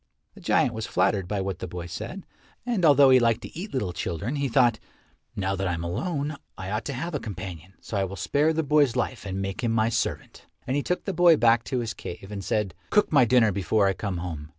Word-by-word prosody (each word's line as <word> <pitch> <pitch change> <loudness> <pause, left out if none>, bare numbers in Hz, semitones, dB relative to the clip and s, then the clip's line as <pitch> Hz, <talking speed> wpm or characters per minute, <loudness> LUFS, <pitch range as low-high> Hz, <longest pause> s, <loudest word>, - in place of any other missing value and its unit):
The - - -15
giant 120 - +2
was 110 0 -4
flattered 95 0 +1
by 100 0 -2
what 95 -2 -3
the - - -5
boy 85 0 -6
said, 110 - -7 0.4
and 235 -7 -1
although 140 -3 +7
he 130 - +7
liked 115 -2 +2
to - - -9
eat 190 +6 -6
little 105 -10 -2
children, 95 - -3
he 140 -1 -1
thought, 120 -2 +3 0.6
"Now 95 0 -1
that 95 0 -2
I 90 - 0
am 85 - -5
alone, 145 - -2 0.2
I 95 -1 -6
ought 105 +2 -2
to 140 - -3
have 165 +7 -4
a 145 - -1
companion, 95 -4 -8
so 105 - -4
I 100 - +1
will 95 +1 -6
spare 145 - +1
the 160 0 0
boy's 145 -4 +3
life 120 -5 -2
and 95 0 -3
make 95 +4 -4
him 115 - +1
my 115 0 +2
servant." 115 - -3 0.2
And 130 - -1
he 145 - +1
took 180 +5 -2
the 195 - -2
boy 175 -2 +6
back 115 0 +4
to 130 -2 -1
his 115 -2 -3
cave, 95 +3 -8
and 100 -1 -5
said, 105 -4 -1 0.2
"Cook 210 - +3
my 140 -5 +6
dinner 120 -2 +4
before 100 +2 +1
I 95 - +2
come 100 -2 -4
home. 80 -4 -6
110 Hz, 245 wpm, -26 LUFS, 95-140 Hz, 0.6 s, although